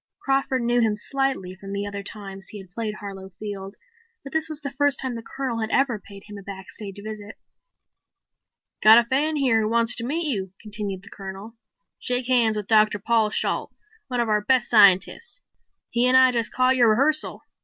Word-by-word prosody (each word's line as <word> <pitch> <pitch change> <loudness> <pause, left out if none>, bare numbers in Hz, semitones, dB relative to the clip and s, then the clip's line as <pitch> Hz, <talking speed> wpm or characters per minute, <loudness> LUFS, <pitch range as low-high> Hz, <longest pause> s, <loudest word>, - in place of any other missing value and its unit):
Crawford 270 -2 0
knew 240 +1 +2
him 220 -2 +2
slightly 265 -5 -2
from 195 +1 -9
the 200 0 -3
other 200 0 -5
two 200 - -8
times 195 -2 -10
he 210 - -9
had 190 -3 -12
played 215 +1 -4
Harlow 195 -2 -9
Field, 200 -2 -7 0.5
but 275 - -10
this 315 0 +1
was 310 -1 -4
the 280 -1 -5
first 285 0 +1
time 260 -2 -2
the 230 - -6
Colonel 250 0 -4
had 220 -1 -2
ever 255 -5 +1
paid 200 -1 -12
him 210 -1 -9
a - - -10
backstage 195 +1 -8
visit. 215 -1 -8 1.4
"Got 220 +1 +8
a 240 - +6
fan 285 +6 0
here 255 -6 +2
who 215 - -1
wants 230 0 +5
to 230 - -1
meet 315 +7 0
you," 195 -10 0
continued 205 -3 -5
the 200 - -14
Colonel. 195 +3 -9 0.4
"Shake 250 0 -1
hands 235 -4 +2
with 210 - -4
Dr. 215 -1 +3
Paul 220 +1 +1
Shalt, - - -2 0.3
one 250 -3 -3
of 235 - +1
our 210 -1 +1
base 255 +4 +2
scientists. 210 - +3 0.5
He 240 +1 +3
and 255 +1 +5
I 260 0 +6
just 235 -2 0
caught 255 +1 +2
your 240 -3 +4
rehearsal. 285 +8 +1
225 Hz, 200 wpm, -23 LUFS, 205-255 Hz, 1.4 s, Got